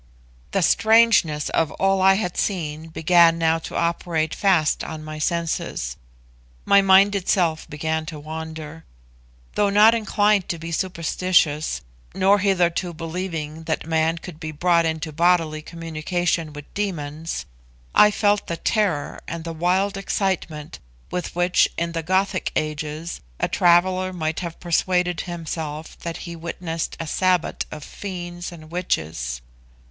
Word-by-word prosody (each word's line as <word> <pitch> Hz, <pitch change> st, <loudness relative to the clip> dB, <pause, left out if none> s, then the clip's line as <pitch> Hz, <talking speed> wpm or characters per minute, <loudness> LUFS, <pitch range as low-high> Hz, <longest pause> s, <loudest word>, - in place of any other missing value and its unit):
The 195 Hz, -, +1 dB
strangeness 220 Hz, -9 st, +4 dB
of 160 Hz, -, +1 dB
all 195 Hz, 0 st, +2 dB
I 190 Hz, +1 st, +6 dB
had 180 Hz, -4 st, -2 dB
seen 160 Hz, -5 st, -2 dB
began 165 Hz, +1 st, +4 dB
now 165 Hz, 0 st, +2 dB
to -, -, -8 dB
operate 170 Hz, -2 st, 0 dB
fast 180 Hz, -7 st, +2 dB
on 155 Hz, -1 st, -6 dB
my 155 Hz, 0 st, -7 dB
senses; 165 Hz, -, -2 dB, 0.7 s
my 200 Hz, -, +6 dB
mind 195 Hz, +1 st, +6 dB
itself 175 Hz, -4 st, 0 dB
began 160 Hz, +1 st, -2 dB
to 155 Hz, -2 st, -6 dB
wander. 160 Hz, +1 st, -7 dB, 0.7 s
Though 205 Hz, -, +2 dB
not 210 Hz, +3 st, +6 dB
inclined 210 Hz, -3 st, +2 dB
to 170 Hz, -, -1 dB
be 165 Hz, +1 st, -7 dB
superstitious, 165 Hz, -3 st, +1 dB, 0.3 s
nor 195 Hz, +2 st, +4 dB
hitherto 180 Hz, -3 st, +1 dB
believing 165 Hz, -2 st, -5 dB
that 160 Hz, -2 st, -2 dB
man 160 Hz, 0 st, +1 dB
could 170 Hz, -2 st, -10 dB
be 155 Hz, -2 st, -5 dB
brought 170 Hz, +2 st, +2 dB
into 160 Hz, 0 st, -3 dB
bodily 165 Hz, -1 st, +2 dB
communication 165 Hz, 0 st, -2 dB
with 145 Hz, -1 st, -11 dB
demons, 165 Hz, -, -3 dB, 0.5 s
I 210 Hz, -, +7 dB
felt 205 Hz, 0 st, +1 dB
the 170 Hz, -, -3 dB
terror 195 Hz, -10 st, 0 dB
and 170 Hz, 0 st, -5 dB
the 165 Hz, 0 st, -5 dB
wild 185 Hz, +4 st, +1 dB
excitement 165 Hz, -, -2 dB, 0.3 s
with 180 Hz, -1 st, -4 dB
which, 175 Hz, +1 st, +3 dB
in 170 Hz, 0 st, -1 dB
the 165 Hz, -1 st, -2 dB
Gothic 185 Hz, +3 st, 0 dB
ages, 155 Hz, +2 st, -3 dB, 0.2 s
a -, -, +1 dB
traveller 185 Hz, +2 st, +3 dB
might 160 Hz, -3 st, -2 dB
have 170 Hz, -2 st, -6 dB
persuaded 180 Hz, 0 st, +1 dB
himself 160 Hz, -3 st, -5 dB
that 170 Hz, +1 st, -6 dB
he 170 Hz, -1 st, -6 dB
witnessed 165 Hz, 0 st, -4 dB
a 165 Hz, -, -3 dB
'sabbat' 180 Hz, +1 st, +1 dB
of 150 Hz, -, -8 dB
fiends 175 Hz, -2 st, -6 dB
and 160 Hz, -2 st, -12 dB
witches. 80 Hz, -, -2 dB
170 Hz, 140 wpm, -23 LUFS, 160-185 Hz, 0.7 s, I